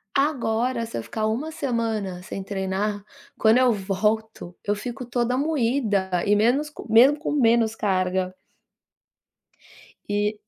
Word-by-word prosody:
Agora 250 Hz, -4 st, 0 dB
se 225 Hz, -, -6 dB
eu 115 Hz, -, -4 dB
ficar 215 Hz, -1 st, -3 dB
1 265 Hz, +9 st, -2 dB
semana 225 Hz, -, -2 dB
sem 195 Hz, +1 st, -6 dB
treinar, 200 Hz, +1 st, -2 dB, 0.3 s
quando 220 Hz, +2 st, +4 dB
eu 255 Hz, -1 st, +4 dB
volto, 210 Hz, -1 st, -2 dB
eu 205 Hz, -, +1 dB
fico 245 Hz, +4 st, -6 dB
toda 245 Hz, +1 st, 0 dB
moída 240 Hz, -9 st, 0 dB, 0.2 s
e 205 Hz, 0 st, +4 dB
menos 245 Hz, +8 st, +2 dB
co 280 Hz, -6 st, -10 dB
mesmo 255 Hz, +6 st, +7 dB
com 310 Hz, -, -3 dB
menos 230 Hz, -5 st, +3 dB
carga. 185 Hz, -3 st, 0 dB, 1.8 s
E. 205 Hz, +1 st, 0 dB
220 Hz, 130 wpm, -24 LUFS, 200-250 Hz, 1.8 s, mesmo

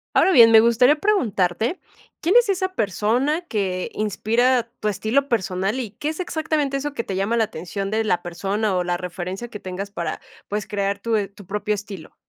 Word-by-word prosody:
Ahora 380 Hz, -, +5 dB
bien, 230 Hz, -8 st, +8 dB
me 225 Hz, -, +9 dB
gustaría 240 Hz, +5 st, +5 dB
preguntarte, 235 Hz, -, 0 dB, 0.4 s
¿quién 350 Hz, +6 st, +2 dB
es 485 Hz, -3 st, +4 dB
esa 375 Hz, -1 st, 0 dB
persona 235 Hz, -, 0 dB
que 190 Hz, -, -2 dB
inspira 230 Hz, +5 st, +1 dB, 0.2 s
tu 215 Hz, -, -2 dB
estilo 220 Hz, +8 st, 0 dB
personal 195 Hz, +1 st, -1 dB
y 225 Hz, -5 st, -4 dB
qué 295 Hz, +8 st, -4 dB
es 315 Hz, -, -5 dB
exactamente 315 Hz, -5 st, -1 dB
eso 290 Hz, +1 st, -4 dB
que 230 Hz, -, -3 dB
te 195 Hz, -, -4 dB
llama 200 Hz, +5 st, 0 dB
la 225 Hz, -, +4 dB
atención 195 Hz, 0 st, -5 dB
de 220 Hz, +1 st, +1 dB
la 180 Hz, -5 st, 0 dB
persona 195 Hz, +4 st, -1 dB
o 180 Hz, -, +1 dB
la 175 Hz, 0 st, -1 dB
referencia 180 Hz, +5 st, -5 dB
que 210 Hz, -, -8 dB
tengas 190 Hz, +2 st, -6 dB
para, 170 Hz, -5 st, -4 dB, 0.3 s
pues, 210 Hz, 0 st, -3 dB
crear 200 Hz, -1 st, -1 dB
tu 230 Hz, +2 st, -1 dB
e 200 Hz, -2 st, -1 dB
tu 200 Hz, 0 st, -15 dB
propio 210 Hz, +2 st, -1 dB
estilo? 200 Hz, -5 st, -9 dB
215 Hz, 195 wpm, -22 LUFS, 195-255 Hz, 0.4 s, me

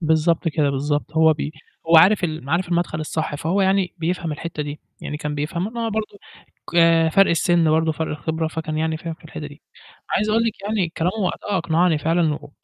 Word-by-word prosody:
بالضبط 160 Hz, +1 st, +2 dB
كده، 150 Hz, -3 st, +1 dB
بالضبط. 145 Hz, +2 st, -2 dB
هو 160 Hz, 0 st, +5 dB
ب 150 Hz, -1 st, -4 dB, 0.4 s
هو 165 Hz, -, +7 dB
عارف 185 Hz, +4 st, +6 dB
ال 155 Hz, -3 st, -3 dB
م 140 Hz, -, -8 dB
عارف 175 Hz, +2 st, +1 dB
المدخل 170 Hz, -2 st, -1 dB
الصح، 155 Hz, 0 st, -3 dB
فهو 165 Hz, +7 st, 0 dB
يعني 190 Hz, -1 st, +1 dB
بيفهم 170 Hz, -1 st, -2 dB
الحِتّة 155 Hz, 0 st, -5 dB
دي، 145 Hz, 0 st, -7 dB, 0.2 s
يعني 150 Hz, -, -5 dB
كان 150 Hz, 0 st, -4 dB
بيفهم 170 Hz, +8 st, -3 dB
ما 230 Hz, -1 st, -2 dB
برضه 215 Hz, -1 st, -4 dB, 0.5 s
ك -, -, -4 dB, 0.4 s
فرق 195 Hz, 0 st, +5 dB
السن 170 Hz, 0 st, +3 dB
برضه 160 Hz, +1 st, +2 dB
فرق 160 Hz, +1 st, -3 dB
الخبرة 160 Hz, +1 st, -2 dB
فكان 155 Hz, -1 st, -4 dB
يعني 160 Hz, 0 st, 0 dB
فاهم 165 Hz, 0 st, -6 dB
في 160 Hz, -, -25 dB
الحِتّة 155 Hz, -1 st, -7 dB
دي، 145 Hz, +1 st, -14 dB, 0.5 s
عايز 210 Hz, +2 st, +1 dB
أقول 225 Hz, +2 st, +3 dB
لِك 225 Hz, -3 st, -3 dB
يعني 205 Hz, -4 st, 0 dB
كلامه 175 Hz, +3 st, -2 dB
وقتها 200 Hz, +1 st, -1 dB
أقنعني 165 Hz, -1 st, +2 dB
فعلًا 160 Hz, 0 st, +1 dB
و 145 Hz, -, -10 dB
160 Hz, 205 wpm, -22 LUFS, 155-180 Hz, 0.5 s, هو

